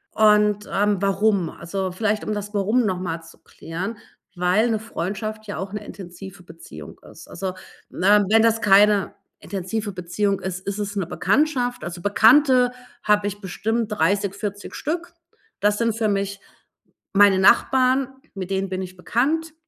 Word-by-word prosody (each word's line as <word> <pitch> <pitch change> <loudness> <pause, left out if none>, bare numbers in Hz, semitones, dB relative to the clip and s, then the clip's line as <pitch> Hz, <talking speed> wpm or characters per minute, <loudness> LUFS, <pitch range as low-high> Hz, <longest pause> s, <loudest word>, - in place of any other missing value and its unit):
Und, 210 -1 +3
ähm, 205 0 +1
warum? 195 -2 +1
Also 185 +2 -4
vielleicht 215 +3 -1
um 215 - -2
das 205 0 -5
Warum 215 +4 +1
noch 185 -3 -1
mal 165 -3 -4
zu 165 0 -16
klären, 190 +7 -7 0.4
weil 180 +6 +2
'ne 220 -2 0
Freundschaft 215 +1 -5
ja 205 - -5
auch 190 +1 -6
'ne 210 0 -5
intensive 190 0 -10
Beziehung 165 - -12
ist. - - -15
Also, 190 -1 -5 0.4
ne, 205 +2 +3
wenn 220 +1 +5
das 225 0 +2
keine 205 -1 +4 0.3
intensive 205 +3 -4
Beziehung 185 +2 -1
ist, 190 0 -5
ist 200 +1 -3
es 205 0 -4
'ne 195 -3 -1
Bekanntschaft. 245 - 0
Also, 175 0 -6
Bekannte 250 - +5 0.3
habe 210 -1 +2
ich 205 0 -6
bestimmt 220 +4 -2
30, 200 +1 +1
40 205 0 -6
Stück. 340 +3 -4 0.5
Das 205 0 +2
sind 230 -1 0
für 225 -1 0
mich 200 -1 -2 0.7
meine 200 -1 +5
Nachbarn, 255 +5 +4 0.3
mit 190 -1 -6
denen 195 0 -1
bin 185 0 -3
ich 185 0 -8
bekannt. 300 - -1
205 Hz, 160 wpm, -22 LUFS, 190-220 Hz, 0.7 s, wenn